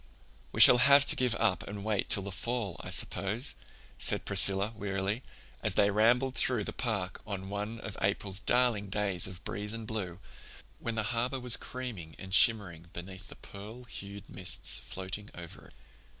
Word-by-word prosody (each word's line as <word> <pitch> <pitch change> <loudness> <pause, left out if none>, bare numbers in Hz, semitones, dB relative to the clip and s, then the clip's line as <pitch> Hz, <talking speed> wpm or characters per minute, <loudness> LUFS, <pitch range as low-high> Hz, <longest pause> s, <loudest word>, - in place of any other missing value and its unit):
"We - - -5
shall 125 - +9
have 140 +2 +6
to - - +3
give 125 -3 0
up 110 -5 +2
and 100 0 -7
wait 105 -3 -1
till 100 - +2
the 100 - -6
fall, 105 0 -3
I - - -7
suppose," 110 +8 +1 0.5
said - - +3
Priscilla 100 +3 +4
wearily, 100 +2 -3 0.4
as - - -1
they 100 0 +3
rambled 120 +5 +2
through 125 -4 +1
the - - -5
park 100 -6 -3
on 95 -2 -5
one 105 +3 -5
of 100 - -7
April's 100 0 -1
darling 115 -3 +2
days 95 -3 0
of 95 0 -11
breeze 105 +1 -3
and 115 -1 -6
blue, 100 -6 -5 0.6
when 115 -1 -3
the 110 - -1
harbor 125 +3 -1
was 125 -1 +3
creaming 110 -12 -7
and 95 0 -9
shimmering 95 -7 +4
beneath 95 +2 -8
the - - -11
pearl 110 +5 -11
hued 100 -3 -9
mists 90 -1 +1
floating 95 +2 -6
over 85 -1 -10
it. - - -20
105 Hz, 175 wpm, -30 LUFS, 95-115 Hz, 0.6 s, shall